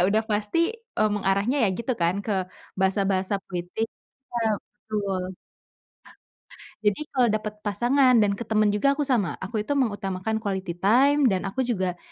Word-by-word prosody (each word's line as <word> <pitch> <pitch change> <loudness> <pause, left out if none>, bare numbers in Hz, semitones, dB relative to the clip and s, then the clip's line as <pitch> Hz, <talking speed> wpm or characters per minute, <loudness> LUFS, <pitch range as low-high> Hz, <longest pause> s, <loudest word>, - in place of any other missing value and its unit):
udah 215 +2 +2
pasti, 210 +6 0 0.4
eee, 215 - +4
mengarahnya 200 +5 +1
ya - - +3
gitu 245 +2 -1
kan, 170 +1 +3
ke 215 - 0 0.5
bahasa-bahasa 190 0 +1
puitis, 180 +5 -3 0.5
iya 230 -2 +1
betul. 210 -5 -4 1.6
Jadi 210 +9 +1
kalo 255 -2 +3
dapet 215 0 -3
pasangan 250 +6 +3
dan 200 -1 +2
ke 235 - -5
temen 215 -1 +2
juga 210 +7 +2
aku 290 - -3
sama, 250 -10 +1
aku 210 +2 -3
itu 285 - 0
mengutamakan 210 -5 -1
quality 190 -5 -3
time 270 +10 +4
dan 190 -6 +2
aku 260 +6 -1
juga, 190 -7 -1
210 Hz, 150 wpm, -25 LUFS, 195-240 Hz, 1.6 s, eee